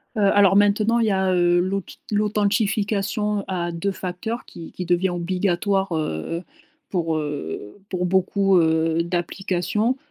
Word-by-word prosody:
Heu, 215 Hz, -, 0 dB
alors 195 Hz, -2 st, +5 dB
maintenant, 210 Hz, +3 st, +3 dB
il 230 Hz, -, +2 dB
y -, -, +2 dB
a, 190 Hz, -1 st, +1 dB
heu, 175 Hz, 0 st, +3 dB
l'auth 190 Hz, +1 st, -3 dB
l'authentification 210 Hz, 0 st, 0 dB
à 175 Hz, -2 st, -2 dB
2 170 Hz, +4 st, -2 dB
facteurs 190 Hz, +6 st, -5 dB
qui 165 Hz, -, -10 dB
qui 180 Hz, -, -6 dB
devient 175 Hz, +2 st, +2 dB
obligatoire, 185 Hz, +2 st, 0 dB
heu, 155 Hz, -, -3 dB, 0.5 s
pour, 165 Hz, -4 st, 0 dB
heu, 145 Hz, -, -5 dB
pour 180 Hz, -1 st, -1 dB
beaucoup, 190 Hz, +1 st, +2 dB
heu, 160 Hz, 0 st, +2 dB
d'applications. 185 Hz, +6 st, -1 dB
190 Hz, 135 wpm, -23 LUFS, 175-205 Hz, 0.5 s, alors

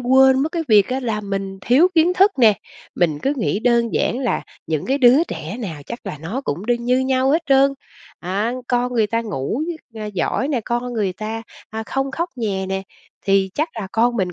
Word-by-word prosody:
quên 265 Hz, +2 st, +5 dB
mất 310 Hz, -, -2 dB
cái 335 Hz, -2 st, -1 dB
việc 210 Hz, -3 st, +5 dB
á 260 Hz, +1 st, -1 dB
là 225 Hz, -4 st, -2 dB
mình 195 Hz, -1 st, -4 dB
thiếu 270 Hz, -, +4 dB
kiến 335 Hz, +2 st, +4 dB
thức 390 Hz, +3 st, +5 dB
nè. 225 Hz, -4 st, +6 dB, 0.4 s
Mình 160 Hz, -4 st, +1 dB
cứ 275 Hz, -, +1 dB
nghĩ 215 Hz, -4 st, 0 dB
đơn 235 Hz, -2 st, +2 dB
giản 240 Hz, -, +1 dB
là 255 Hz, -3 st, -1 dB, 0.2 s
những 155 Hz, -2 st, -2 dB
cái 270 Hz, +2 st, +1 dB
đứa 260 Hz, +5 st, +6 dB
trẻ 165 Hz, -, -6 dB
nào 160 Hz, -9 st, -5 dB
chắc 235 Hz, -, -6 dB
là 180 Hz, -6 st, -5 dB
nó 175 Hz, -, -4 dB
cũng 175 Hz, +8 st, -3 dB
đương 240 Hz, 0 st, 0 dB
như 250 Hz, +1 st, +3 dB
nhau 260 Hz, 0 st, +2 dB
hết 320 Hz, +3 st, +2 dB
trơn. 275 Hz, 0 st, +5 dB, 0.5 s
Á, 200 Hz, +6 st, -1 dB, 0.2 s
con 245 Hz, 0 st, +1 dB
người 225 Hz, -3 st, +2 dB
ta 230 Hz, +2 st, 0 dB
ngủ, 215 Hz, -, -3 dB, 0.3 s
ờ, 215 Hz, -1 st, -5 dB
giỏi 210 Hz, +7 st, -1 dB
nè, 260 Hz, -6 st, 0 dB
con 240 Hz, +1 st, -2 dB
người 205 Hz, -5 st, 0 dB
ta, 220 Hz, +3 st, -5 dB, 0.3 s
à, 220 Hz, 0 st, -4 dB
không 270 Hz, 0 st, -1 dB
khóc 340 Hz, +5 st, -2 dB
nhè 195 Hz, -5 st, -2 dB
nè, 190 Hz, 0 st, -2 dB, 0.4 s
thì 195 Hz, -1 st, +3 dB
chắc 310 Hz, +3 st, 0 dB
là 215 Hz, -4 st, -4 dB
con 235 Hz, +2 st, +2 dB
mình 185 Hz, -4 st, -1 dB
235 Hz, 220 wpm, -20 LUFS, 195-265 Hz, 0.5 s, nè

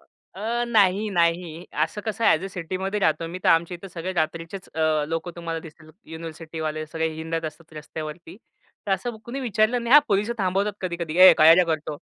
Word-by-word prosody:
अ, 230 Hz, +4 st, -5 dB
नाही, 210 Hz, -2 st, +3 dB
नाही 170 Hz, -1 st, 0 dB, 0.2 s
असं 185 Hz, +6 st, -7 dB
कसं 220 Hz, +1 st, -2 dB
आहे -, -, +6 dB
ॲज 165 Hz, -, -7 dB
अ -, -, -2 dB
सिटीमध्ये 190 Hz, +4 st, -3 dB
राहतो 160 Hz, -2 st, +1 dB
मी 180 Hz, -, -6 dB
तर -, -, +4 dB
आमच्या 170 Hz, +2 st, +3 dB
इथे 195 Hz, +3 st, -11 dB
सगळे 180 Hz, +1 st, -5 dB
रात्रीचेच 165 Hz, +2 st, -3 dB
अ, 155 Hz, -1 st, +1 dB
लोकं 165 Hz, +2 st, -3 dB
तुम्हाला 165 Hz, -1 st, -4 dB
दिसतील 155 Hz, 0 st, -15 dB, 0.2 s
युनिव्हर्सिटीवाले 160 Hz, -1 st, -5 dB
सगळे 160 Hz, +1 st, -2 dB
हिंडत 165 Hz, +1 st, -4 dB
असतात 160 Hz, +1 st, -8 dB
रस्त्यावरती. 155 Hz, +3 st, -8 dB, 0.5 s
तर 195 Hz, -, +1 dB
असं 240 Hz, +3 st, -2 dB
कुणी 250 Hz, +3 st, -5 dB
विचारलं 235 Hz, 0 st, +1 dB
नाही 235 Hz, +2 st, 0 dB
हां, 295 Hz, -, +10 dB
पोलिस 205 Hz, +2 st, +1 dB
थांबवतात 195 Hz, +2 st, 0 dB
कधी-कधी 170 Hz, -3 st, -4 dB
"ए -, -, +9 dB
काय 160 Hz, +1 st, +8 dB
रे 180 Hz, +1 st, +4 dB
करतो." 155 Hz, -2 st, -3 dB
170 Hz, 190 wpm, -24 LUFS, 160-195 Hz, 0.5 s, हां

